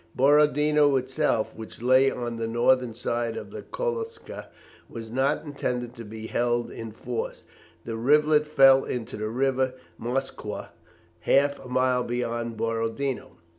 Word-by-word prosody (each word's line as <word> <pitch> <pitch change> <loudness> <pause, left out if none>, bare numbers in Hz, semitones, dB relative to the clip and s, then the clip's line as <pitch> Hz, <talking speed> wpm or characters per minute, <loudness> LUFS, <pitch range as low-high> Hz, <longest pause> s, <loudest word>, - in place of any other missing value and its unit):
Borodino 150 +1 +4
itself 130 -2 0
which 110 0 -10
lay 130 +3 +5
on 120 -2 -4
the 115 0 -2
northern 120 +1 +2
side 120 -1 -2
of - - -7
the - - -7
Kolocza 465 -2 -5 0.4
was 115 -1 -8
not 135 +5 0
intended 125 -4 -3
to 115 - -8
be 110 +1 -8
held 120 +1 0
in 115 -1 -7
force. 115 +1 -5 0.4
The 115 - -4
rivulet 150 +5 +3
fell 135 -2 +6
into 120 -3 -4
the 110 0 -3
river 130 +1 0 0.2
Moskwa 130 +4 -4 0.5
half 140 +9 +2
a - - -10
mile 130 0 +2
beyond 120 -1 -3
Borodino. 115 +4 -2
125 Hz, 135 wpm, -26 LUFS, 115-140 Hz, 0.5 s, fell